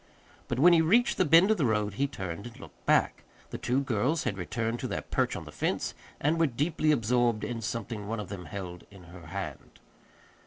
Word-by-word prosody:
But 120 - -2
when 175 +6 +7
he 165 - +6
reached 240 +11 +3
the 185 - +4
bend 170 +6 +6
of 220 - +3
the 145 - +1
road 105 -2 0
he 140 +7 0
turned 95 -5 -6
and 120 +2 -13
looked - - -14
back. - - +2 0.3
The - - -5
two 130 +3 +1
girls 135 +5 0
had 115 -5 -1
returned 115 +5 -2
to - - -3
their - - -3
perch - - 0
on - - -6
the - - -10
fence, - - -2 0.3
and 155 +3 +1
were 165 - +4
deeply 155 +4 +1
absorbed 120 -3 +2
in 115 -2 -3
something 115 -2 -4
one 115 +1 -3
of 105 - -6
them 90 -3 -7
held 90 +1 -7
in 95 -3 -14
her 85 -3 -11
hand. 100 +4 -7
120 Hz, 220 wpm, -29 LUFS, 100-150 Hz, 0.3 s, when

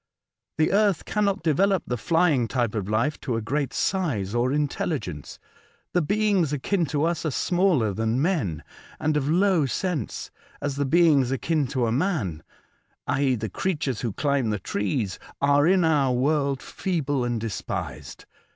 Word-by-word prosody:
The 155 - +2
earth 200 -4 +2
cannot 205 -2 0
develope 190 +4 +2
the 125 - -2
flying 155 0 +2
type 120 -2 -1
of 105 -3 -3
life 115 +8 0
to 125 - -2
a 115 - -1
great 140 +4 -1
size 130 - -1
or 120 +2 +1
intelligence. 140 - -2 0.6
The 180 - +3
beings 200 -2 +1
akin 160 +5 0
to 145 0 -1
us 170 +1 0
are 160 - 0
smaller 165 - +1
than 110 +4 0
men, 135 - 0 0.4
and 155 0 0
of 145 -1 0
low 180 -3 +3
sense; 160 - -3 0.3
as 140 -1 -3
the 140 - +1
beings 155 -5 +4
akin 145 +2 0
to 125 -3 0
man 120 - -1 0.6
{i.e. 135 -2 +1
the 110 -1 -3
creatures 145 - -2
who 120 -4 -1
climb 140 0 0
the 105 - 0
trees) 100 0 -2 0.2
are 145 +2 +4
in 185 -1 +4
our 145 -5 +3
world 140 +1 +1
feeble 145 -8 -2
and 120 -1 -1
despised. 110 -3 -5
145 Hz, 155 wpm, -25 LUFS, 120-170 Hz, 0.6 s, beings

